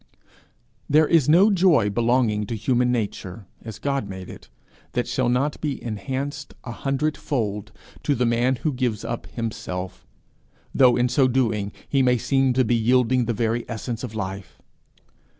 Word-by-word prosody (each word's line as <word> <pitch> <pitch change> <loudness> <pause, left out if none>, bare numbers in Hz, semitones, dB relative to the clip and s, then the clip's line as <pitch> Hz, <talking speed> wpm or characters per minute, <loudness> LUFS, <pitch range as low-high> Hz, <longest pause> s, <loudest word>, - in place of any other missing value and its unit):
There 155 +2 +5
is 160 -5 +3
no 190 +7 +6
joy 170 - +4
belonging 115 -2 +1
to 115 - -3
human 125 +2 +1
nature, 100 -3 -4 0.2
as 110 -3 -8
God 140 -7 -2
made 95 -1 -7
it, 65 - -13 0.4
that 120 - -1
shall 130 -2 0
not 135 +4 0
be 150 -3 -2
enhanced 135 +6 -4
a 120 - -6
hundredfold 130 -7 -2 0.3
to 145 - +1
the 125 - +1
man 120 +3 +2
who 150 +4 -2
gives 125 -5 -2
up 120 - -4
himself 95 -5 -5 0.7
though, 125 -2 +5
in 125 0 +3
so 130 +1 +3
doing, 110 -6 0 0.2
he 135 - +2
may 125 -1 +3
seem 135 +2 +1
to 130 0 +2
be 120 - +2
yielding 125 +2 +2
the 120 - -1
very 115 +2 -1
essence 115 +1 -4
of 115 -3 -6
life. 95 -2 -6
120 Hz, 160 wpm, -23 LUFS, 110-135 Hz, 0.7 s, no